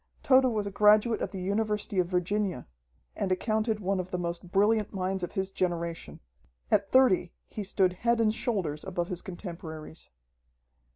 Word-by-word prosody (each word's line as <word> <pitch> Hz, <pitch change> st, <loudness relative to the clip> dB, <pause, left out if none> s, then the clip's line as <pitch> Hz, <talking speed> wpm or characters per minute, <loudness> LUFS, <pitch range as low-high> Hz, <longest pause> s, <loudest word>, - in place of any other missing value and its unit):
Tode 260 Hz, 0 st, +5 dB
was 210 Hz, -2 st, -1 dB
a 200 Hz, -, -4 dB
graduate 210 Hz, +2 st, +4 dB
of -, -, -1 dB
the 195 Hz, -, -7 dB
University 210 Hz, 0 st, -1 dB
of 180 Hz, -, +2 dB
Virginia, 185 Hz, -3 st, -1 dB, 0.5 s
and 190 Hz, -, -2 dB
accounted 215 Hz, +3 st, 0 dB
one 195 Hz, -1 st, -1 dB
of 185 Hz, 0 st, -4 dB
the 180 Hz, -, -2 dB
most 175 Hz, 0 st, -5 dB
brilliant 210 Hz, +1 st, +2 dB
minds 190 Hz, 0 st, -1 dB
of 175 Hz, -, -4 dB
his 190 Hz, 0 st, -2 dB
generation. 170 Hz, -3 st, -3 dB, 0.5 s
At 195 Hz, -, +2 dB
thirty, 220 Hz, -9 st, +4 dB
he 210 Hz, -, -6 dB
stood 190 Hz, -2 st, +1 dB
head 235 Hz, +5 st, +1 dB
and 215 Hz, -1 st, +3 dB
shoulders 185 Hz, -11 st, -2 dB
above 180 Hz, -2 st, -3 dB
his 180 Hz, -1 st, -4 dB
contemporaries. 165 Hz, -5 st, -8 dB
190 Hz, 165 wpm, -28 LUFS, 180-215 Hz, 0.5 s, Tode